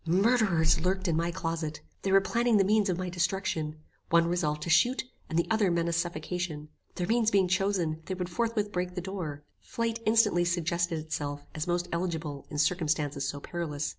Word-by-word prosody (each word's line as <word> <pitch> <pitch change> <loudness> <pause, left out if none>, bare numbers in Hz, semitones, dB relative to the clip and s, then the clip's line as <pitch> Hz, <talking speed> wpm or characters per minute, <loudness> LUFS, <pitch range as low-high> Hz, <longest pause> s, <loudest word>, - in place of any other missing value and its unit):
Murderers 190 -4 +3
lurked 190 +1 0
in 165 - +2
my 170 +1 +1
closet. 165 -3 -3 0.2
They 195 - -1
were 195 0 +6
planning 235 +2 +2
the 195 - +5
means 210 +1 +3
of 180 - 0
my 185 0 -3
destruction. 170 -3 -1 0.3
One 170 0 +5
resolved 155 -3 0
to 165 - -4
shoot, 245 +10 +4 0.3
and 160 - -1
the 170 - +3
other 215 -3 +3
menaced 170 -1 +1
suffocation. 170 -2 -4 0.3
Their 180 - -1
means 225 +2 +3
being 195 -3 +3
chosen, 185 -4 0
they 185 - -2
would 180 -1 -3
forthwith 215 +2 -1
break 180 -1 -2
the 180 - -2
door. 170 -6 -5 0.2
Flight 230 0 -3
instantly 215 -5 +4
suggested 170 0 0
itself 145 -2 -4
as 155 +2 -3
most 175 0 0
eligible 160 -5 -3
in 150 - -5
circumstances 150 -3 +1
so 145 - -4
perilous. 150 -2 -3
175 Hz, 185 wpm, -29 LUFS, 160-195 Hz, 0.3 s, were